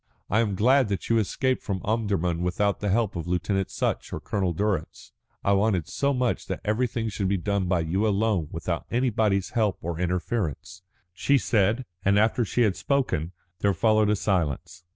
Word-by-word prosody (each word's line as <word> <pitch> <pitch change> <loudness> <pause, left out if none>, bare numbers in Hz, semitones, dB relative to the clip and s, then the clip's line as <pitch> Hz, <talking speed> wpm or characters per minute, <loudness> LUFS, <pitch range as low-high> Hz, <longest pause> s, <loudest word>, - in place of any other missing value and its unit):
"I 105 - +3
am 105 -4 +1
glad 130 +5 +4
that 100 -2 -3
you 115 -1 +4
escaped 130 +5 0
from 95 -3 -3
Omdurman 100 -6 0
without 95 +3 0
the 105 - -1
help 105 0 +1
of 85 -1 -4
Lieutenant 90 +2 0
Sutch - - -2
or - - -4
Colonel 95 -4 -1
Durrance. 95 -1 -2 0.3
I 100 - +2
wanted 100 -4 +1
so 140 0 0
much 125 -3 -1
that - - -3
everything 115 +1 0
should 100 -2 -2
be 100 +1 +1
done 100 +1 -1
by 90 -2 +2
you 95 +7 0
alone 100 -5 +1
without 85 -2 -4
anybody's 110 -6 +1
help 110 -4 +1
or 85 0 -3
interference," 90 - -2 0.3
she 140 +10 +2
said, 105 +3 +1 0.2
and 100 +1 +3
after 110 +3 +3
she 120 +3 +1
had 100 -4 +2
spoken 130 - -1 0.3
there 100 -2 +2
followed 110 +1 +3
a 105 - +3
silence. 90 -3 -2
100 Hz, 180 wpm, -26 LUFS, 90-110 Hz, 0.3 s, glad